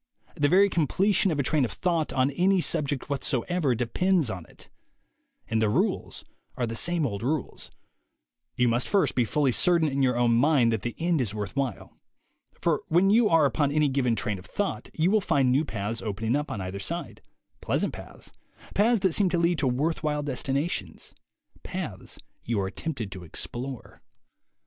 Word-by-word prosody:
The 145 -3 +1
very 195 +3 +6
completion 195 +4 +2
of 155 -4 -1
a - - +2
train 150 +2 +2
of 120 - -1
thought 170 -4 -1
on 130 +1 +1
any 185 +6 +2
subject 145 -5 0
whatsoever 140 +1 0
depends 155 - +1
upon 90 -3 -7
it. - - -13 0.8
And 110 0 0
the 110 - +2
rules - - -1 0.3
are 125 - 0
the 115 - -4
same 170 +6 +1
old 100 -6 -3
rules. 140 +3 -3 0.9
You 125 - +2
must 120 +2 +1
first 200 -2 +2
be 125 - +2
fully 140 +4 +1
certain 170 +4 +3
in 140 -1 -1
your 125 -2 +2
own 120 -1 +3
mind 130 -2 +4
that 110 -3 -1
the 120 +2 -4
end 170 -3 +1
is 110 -4 -2
worth 105 0 -5
while. 135 -7 -3 0.7
For - - +1
when 180 +4 +3
you 220 0 +4
are 165 -3 +5
upon 140 +1 +1
any 150 -1 +2
given 130 -3 +1
train 105 -4 -2
of 90 - -14
thought, 205 -1 -3
you 165 +4 +2
will 215 0 +3
find 135 -8 +2
new 135 +4 +3
paths 110 -1 -4
opening 110 +3 -2
up 150 +1 -2
on 100 - -4
either 95 +1 -5
side, 95 - -5 0.4
pleasant - - -1
paths, - - -10 0.4
paths 220 +1 +3
that 190 -3 +2
seem 195 0 +3
to 175 - 0
lead 170 0 +1
to 140 - +1
worth 145 +7 0
while 150 -1 -1
destinations, 140 +3 -3 0.5
paths - - -6 0.3
you 115 -3 -1
are 95 0 -2
tempted 125 -10 -4
to 95 -1 -8
explore. 120 - -6
140 Hz, 185 wpm, -26 LUFS, 120-170 Hz, 0.9 s, very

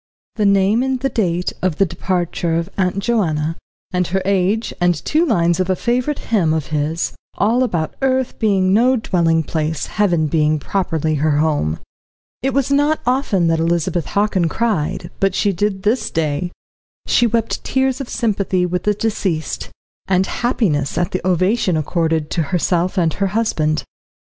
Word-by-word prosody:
The 210 -3 +2
name 200 +3 +3
and 260 0 0
the 270 +1 0
date 180 -7 -1
of 180 -4 0
departure 175 -2 -1
of 170 +3 -2
Aunt 185 -1 0
Joanna, 165 -8 0 0.4
and 180 -2 0
her 190 +2 -1
age, 200 +3 +1
and 175 0 +3
two 315 +2 +2
lines 175 - +2
of 185 0 0
a 185 - +3
favourite 250 +7 0 0.2
hymn 165 -7 +3
of 155 -3 -2
his, 150 +3 -1 0.2
all 230 +5 +2
about 170 -11 -1
earth 260 -1 0
being 195 -3 +2
no 245 +5 +4
dwelling 170 -7 +1
place, 155 0 -2
heaven 175 -6 +1
being 155 0 +2
properly 160 0 -1
her 155 -1 +2
home. 145 - +1 0.6
It 270 - 0
was 275 +1 0
not 290 +2 +2
often 250 -8 +1
that 165 0 +1
Elizabeth 170 0 0
Hockin 200 -4 +1
cried, 175 -6 -1
but 195 -1 +1
she 205 - +2
did 190 +1 -1
this 225 +5 +1
day; 160 +2 -1 0.5
she 240 - +3
wept 230 0 -1
tears 265 0 0
of 265 - -6
sympathy 195 -5 0
with 180 0 -2
the 210 0 +2
deceased, 190 -7 -2 0.4
and 190 0 +2
happiness 170 - 0
at 175 0 0
the 185 - -2
ovation 185 +1 +1
accorded 160 0 -1
to 170 - 0
herself 175 +4 0
and 165 -3 +2
her 200 - 0
husband. 155 -9 0
185 Hz, 165 wpm, -19 LUFS, 165-220 Hz, 0.6 s, no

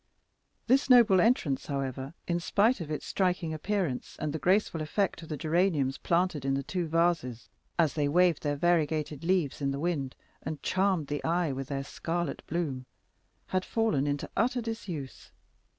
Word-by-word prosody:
This 265 +3 +3
noble 230 -7 +7
entrance, 195 - +1
however, 135 +1 -4
in 175 0 0
spite 205 +5 +2
of 155 - -6
its 150 - -4
striking 180 -4 0
appearance 165 -4 -2
and 150 -1 -3
the 160 - -3
graceful 185 -2 +2
effect 170 +3 -1
of 165 - -11
the 155 - -3
geraniums 155 -4 +1
planted 170 -4 +1
in 135 0 +1
the 140 - -2
two 175 +3 -2
vases, 165 -8 0 0.3
as 160 -5 +3
they 145 -2 0
waved 175 +1 +3
their 145 -1 -1
variegated 155 -2 0
leaves 170 -6 0
in 140 - +1
the 140 0 -2
wind 145 -5 -2 0.3
and 155 0 -6
charmed 190 -4 +1
the 145 +1 -4
eye 170 -1 +1
with 135 0 -4
their 135 -1 -3
scarlet 165 +2 -3
bloom, 145 -6 -3 0.6
had 185 0 0
fallen 215 -13 0
into 145 0 -2
utter 245 +2 +1
disuse. 200 - -6
165 Hz, 165 wpm, -29 LUFS, 145-185 Hz, 0.6 s, noble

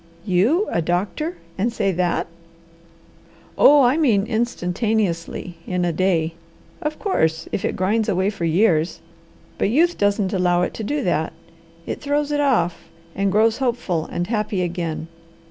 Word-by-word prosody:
"You, 220 - +2
a 170 - +1
doctor 190 - -2 0.2
and 230 +5 +1
say 205 -4 0
that!" 180 -1 0 1.3
"Oh, 290 -1 +7
I 250 +4 +3
mean 225 -11 +3
instantaneously 205 -5 -1
in 180 -1 0
a 170 - 0
day! 165 -2 +1 0.5
Of 305 0 -3
course 160 - 0
if 190 - -2
it - - -1
grinds 215 +4 +1
away 190 +1 +1
for 180 -5 -4
years! 165 -1 +2 0.6
But - - +2
youth 335 +9 +2
doesn't 205 -1 +1
allow 180 -2 +2
it - - -2
to 220 - -6
do 290 +7 -1
that. - - 0 0.5
It - - -5
throws 290 +1 0
it 290 - 0
off, 180 -12 0 0.2
and 195 0 0
grows 220 +3 +3
hopeful 235 -11 -1
and 175 - -3
happy 210 -2 -1
again. 170 -2 -3
200 Hz, 150 wpm, -21 LUFS, 175-240 Hz, 1.3 s, Oh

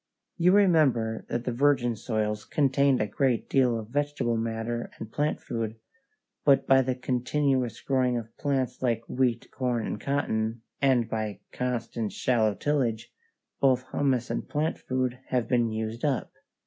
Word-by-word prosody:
You 180 +1 +4
remember 145 - +3
that 120 - -2
the 125 - 0
virgin 125 -2 +2
soils 105 -1 -2
contained 140 -2 +2
a 105 - +1
great 125 +2 0
deal 125 -4 +3
of 110 -1 -7
vegetable 145 -3 0
matter 115 +1 -2
and 110 -1 -8
plant 150 +4 0
food, 115 -2 -4 0.7
but 135 -1 +4
by 135 0 +6
the 130 0 -1
continuous 130 0 0
growing 130 -2 +1
of 115 -1 -7
crops 135 -4 -1
like 115 -3 0
wheat, 125 -2 0
corn, 125 -3 -1
and 105 - -4
cotton, 115 -5 -1 0.2
and 130 -4 +3
by 110 -2 -3
constant 120 -3 -3
shallow 110 -5 +1
tillage, 120 -6 -1 0.5
both 130 -1 +2
humus 130 -4 0
and - - -3
plant 155 +2 -1
food 130 -1 -2
have 125 -3 0
been 120 -2 +2
used 110 +1 -4
up. 140 -4 0
125 Hz, 150 wpm, -27 LUFS, 115-135 Hz, 0.7 s, by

